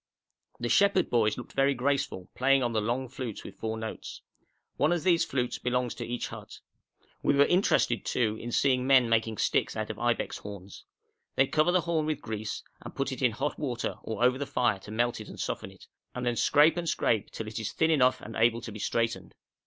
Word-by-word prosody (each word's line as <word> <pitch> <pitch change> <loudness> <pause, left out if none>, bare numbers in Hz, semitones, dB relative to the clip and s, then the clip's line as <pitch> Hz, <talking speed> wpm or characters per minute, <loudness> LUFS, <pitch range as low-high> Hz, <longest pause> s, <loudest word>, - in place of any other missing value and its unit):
The 120 - -2
shepherd 200 +5 +3
boys 110 -3 +2
looked - - -9
very 135 0 +2
graceful, 135 -7 -1
playing 135 +1 +3
on 120 -1 -1
the 110 - +1
long 120 +5 -1
flutes 130 -4 -6
with - - -11
four 110 0 -3
notes. 110 0 -7 0.5
One 150 +3 +3
of 175 -2 0
these 175 -3 +4
flutes 125 -2 -2
belongs 125 -1 -1
to - - -6
each 120 0 -3
hut. - - -10 0.6
We - - +2
were 140 0 +6
interested, 175 - +2
too, 110 -3 0
in 120 - -5
seeing 130 0 +2
men 130 -3 +5
making 110 -1 +1
sticks - - +1
out - - -3
of - - -10
ibex - - -1
horns. 100 -2 -10 0.5
They 135 - +4
cover 155 +5 +2
the 180 0 +3
horn 165 -2 -1
with 155 -2 -1
grease, 110 -2 -5 0.2
and - - -10
put - - -1
it - - -5
in - - +3
hot - - -3
water - - -3
or 110 +1 -3
over 125 +1 +3
the 145 - -3
fire 120 -5 +1
to 95 - -13
melt 120 +2 0
and 110 - -10
soften - - -3
it, - - -16 0.3
and 125 0 -3
then 120 -1 +1
scrape 150 +8 +4
and 170 -1 -1
scrape 110 -8 +1
till 110 - -6
it 105 0 -5
is 110 - -3
thin 160 0 +2
enough 130 -4 +3
and 110 - -9
able 115 +1 +3
to 115 - -7
be 105 - -8
straightened. 110 -4 -2
120 Hz, 215 wpm, -29 LUFS, 110-140 Hz, 0.6 s, were